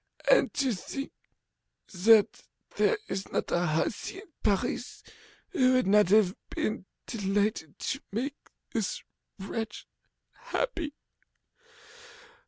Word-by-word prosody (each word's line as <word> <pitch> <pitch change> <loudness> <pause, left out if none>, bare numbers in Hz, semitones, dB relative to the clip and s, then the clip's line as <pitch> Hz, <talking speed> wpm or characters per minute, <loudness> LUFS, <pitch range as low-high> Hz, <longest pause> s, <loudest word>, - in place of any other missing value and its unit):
And - - +5
to 270 -4 +2
think 275 +8 -5 0.8
that 210 +3 +5 0.3
there 450 - +3
is 195 0 -4
not - - -1
a 175 - +2
hussy 160 - -1
in 385 -3 -12
Paris 205 +3 -1 0.5
who 260 -10 +3
would 255 -1 +3
not 205 -1 +5
have 205 -2 +5 0.2
been 215 -3 -2 0.2
delighted 205 -6 -1
to 275 - -2
make 265 +8 -4 0.2
this 220 -6 -2 0.3
wretch 215 +3 -5 0.5
happy! 485 -11 -3
220 Hz, 105 wpm, -29 LUFS, 195-275 Hz, 0.8 s, And